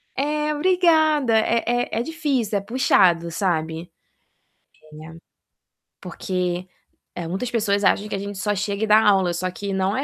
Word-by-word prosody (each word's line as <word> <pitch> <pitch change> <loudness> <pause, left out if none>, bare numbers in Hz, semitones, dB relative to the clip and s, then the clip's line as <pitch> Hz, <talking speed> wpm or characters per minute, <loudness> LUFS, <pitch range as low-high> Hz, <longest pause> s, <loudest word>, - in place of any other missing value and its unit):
é, 300 +2 -1
obrigada 315 -6 +3
é 230 +1 +1
é 245 +1 0
é - - -1
difícil, 275 -9 -1
é - - -9
puxado, 190 -7 +2
sabe 165 -2 -2 1.1
é, 165 +1 -11 0.8
porque 180 0 -3 0.6
muitas 210 +8 -3
pessoas 210 -4 0
acham 205 +1 +2
que - - -3
a - - -4
gente 200 0 -6
só 205 +1 -1
chega 200 +1 -3
e - - -7
dá 215 +1 +6
aula 190 -4 +3
só 185 +2 -3
que 200 +2 -5
não 190 +2 0
é 270 - -1
205 Hz, 155 wpm, -22 LUFS, 185-250 Hz, 1.1 s, dá